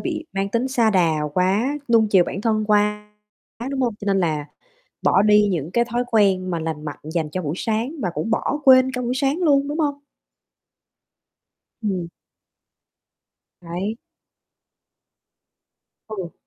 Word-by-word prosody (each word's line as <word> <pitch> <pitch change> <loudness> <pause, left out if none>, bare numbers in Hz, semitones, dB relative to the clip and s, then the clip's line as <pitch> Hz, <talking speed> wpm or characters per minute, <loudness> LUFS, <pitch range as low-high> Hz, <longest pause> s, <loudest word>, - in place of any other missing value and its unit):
bị 320 -2 -4
mang 195 0 -1
tính 235 +5 -1
sa 235 -4 +2
đà 175 -5 +3 0.2
quá, 210 +11 +1
nuông 220 -2 +5
chiều 185 -4 +5
bản 195 - -5
thân 215 -1 0
quá, 210 0 +1 0.6
đúng 275 -1 -2
hông? 240 -4 0
Cho - - -7
nên 195 -1 +2
là 155 -4 -1 0.6
bỏ 195 - +4
đi 210 0 +5
những 165 -4 -2
cái 235 +5 +2
thói 240 +1 -2
quen 195 -4 +2
mà 170 - -1
lành 160 -1 -4
mạnh 145 - -6 0.2
dành 160 -3 -1
cho 185 - -3
buổi 150 -1 -3
sáng 225 +8 -2
và 180 - 0
cũng 225 - -3
bỏ 275 +6 0
quên 260 0 +6
cả 250 -1 -3
buổi 245 +1 -1
sáng 275 +3 0
luôn, 285 -5 +2
đúng 300 +3 -3
hông? 290 -2 +1 1.9
Ừm. 190 -5 -2 1.5
Đấy. 180 +5 -4 2.1
Ừ. 190 -6 -6
210 Hz, 155 wpm, -22 LUFS, 185-250 Hz, 2.1 s, quên